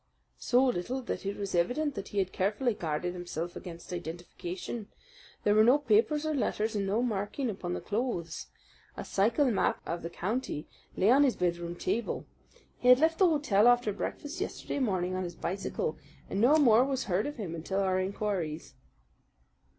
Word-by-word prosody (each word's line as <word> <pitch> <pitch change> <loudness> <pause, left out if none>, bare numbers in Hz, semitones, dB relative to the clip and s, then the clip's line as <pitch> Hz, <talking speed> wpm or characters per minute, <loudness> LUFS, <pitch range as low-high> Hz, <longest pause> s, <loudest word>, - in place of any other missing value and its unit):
"So 250 +2 +3
little 250 +3 -1
that 220 - -4
it 200 - -3
was 200 -1 -4
evident 250 - +1
that 200 -4 -6
he 205 - -7
had 190 -2 +1
carefully 210 +6 +1
guarded 170 -1 -2
himself 175 -1 -5
against 170 0 -8
identification. 175 +5 -6 0.6
There 205 - +4
were 215 +1 +6
no 250 +5 +6
papers 290 +4 +2
or 310 - 0
letters, 220 -5 0
and 200 -1 0
no 215 +5 +1
marking 220 +3 -1
upon 180 -3 -4
the - - -4
clothes. 205 -7 -3 0.5
A - - -5
cycle 235 +7 +2
map 210 - +1
of 170 +1 -3
the 170 - -5
county 190 - -3 0.3
lay 200 +5 +4
on 275 +3 +6
his 275 -4 +4
bedroom 175 -1 -1
table. 230 +6 -2 0.5
He 245 - -1
had 250 0 +9
left 320 +3 +2
the 375 -3 +6
hotel 265 -9 +3
after 245 -3 +4
breakfast 290 - -5
yesterday - - -3
morning 185 -7 0
on 185 0 -1
his 175 -1 -6
bicycle, 170 -4 -3 0.3
and 195 - 0
no 260 +6 +6
more 245 -5 +6
was 270 -1 -1
heard 190 +4 0
of 295 - -5
him 195 -7 -4
until 180 +4 -2
our 185 -1 +1
inquiries." 185 -5 -3
205 Hz, 180 wpm, -30 LUFS, 180-250 Hz, 0.6 s, had